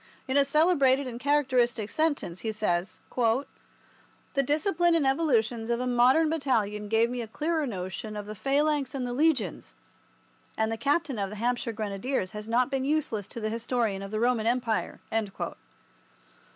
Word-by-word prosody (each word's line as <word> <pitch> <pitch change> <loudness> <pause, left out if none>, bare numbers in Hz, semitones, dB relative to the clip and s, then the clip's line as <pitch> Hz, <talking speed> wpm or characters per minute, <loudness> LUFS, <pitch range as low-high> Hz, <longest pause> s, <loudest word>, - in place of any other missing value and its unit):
In 260 - -1
a 280 - +6
celebrated 280 -2 +3
and 240 -2 -6
characteristic 255 -6 +1
sentence, 290 - -1
he 220 - -2
says, 185 -4 -1 1.4
"The 275 - +3
discipline 335 +4 +2
and 315 -4 +2
evolutions 240 -6 +1
of 235 0 +1
a 250 - -1
modern 250 +6 +4
battalion 225 -10 0
gave 225 +2 +2
me 250 -1 -3
a 230 - -5
clearer 310 +5 -1
notion 200 +1 -5
of 205 - -5
the 210 - -6
Phalanx 280 +3 0
and 260 -2 -2
the 245 - -3
Legions, 295 -2 0 0.8
and 220 0 +1
the - - 0
captain 280 +1 0
of 195 -1 -1
the 210 - -7
Hampshire 240 +2 -1
Grenadiers 215 0 -2
has 210 0 -7
not 245 +3 +2
been 270 -1 0
useless 270 -8 -1
to - - -8
the 215 -1 -2
historian 230 -3 -1
of 195 - -6
the 215 +1 -2
Roman 235 -2 +1
Empire." 235 -2 0
245 Hz, 165 wpm, -28 LUFS, 220-280 Hz, 1.4 s, a